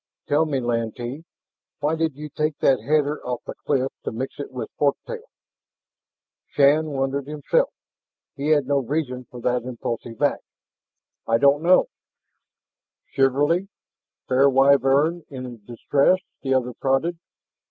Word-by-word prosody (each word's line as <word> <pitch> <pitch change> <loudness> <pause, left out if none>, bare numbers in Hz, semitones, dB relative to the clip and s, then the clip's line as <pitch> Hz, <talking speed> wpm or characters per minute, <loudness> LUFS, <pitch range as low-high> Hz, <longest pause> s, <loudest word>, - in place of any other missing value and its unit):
Tell 155 +2 +2
me, 140 -3 0
Lantee, 120 +4 -3 0.5
why 150 +1 0
did 160 -3 -1
you 150 +2 -7
take 150 +1 -2
that 135 -2 +3
header 150 +3 +1
off 125 -1 -4
the - - -6
cliff 135 -2 +1
to - - -3
mix 130 +6 -5
it 145 - -5
with 125 -1 -6
fork 140 -1 +3
tail?" 485 -1 -7 1.2
Shann 145 +2 +4
wondered 135 0 -2
himself. 155 - +1 0.7
He 140 +1 -3
had 150 -3 +3
no 140 +1 +2
reason 130 -2 -3
for 125 - -10
that 125 +1 +1
impulsive 120 -2 -5
act. - - +2 0.9
"I 115 - +3
don't 140 +4 +4
know 180 +3 +5 0.6
" - - -47
"Chivalry? 145 +8 +2 0.6
Fair 135 +2 +4
Wyvern 140 +4 +4
in 125 -5 -8
distress?" 140 - +2 0.2
the 135 -1 +1
other 125 -1 0
prodded. 135 +8 0
140 Hz, 140 wpm, -23 LUFS, 125-150 Hz, 1.2 s, know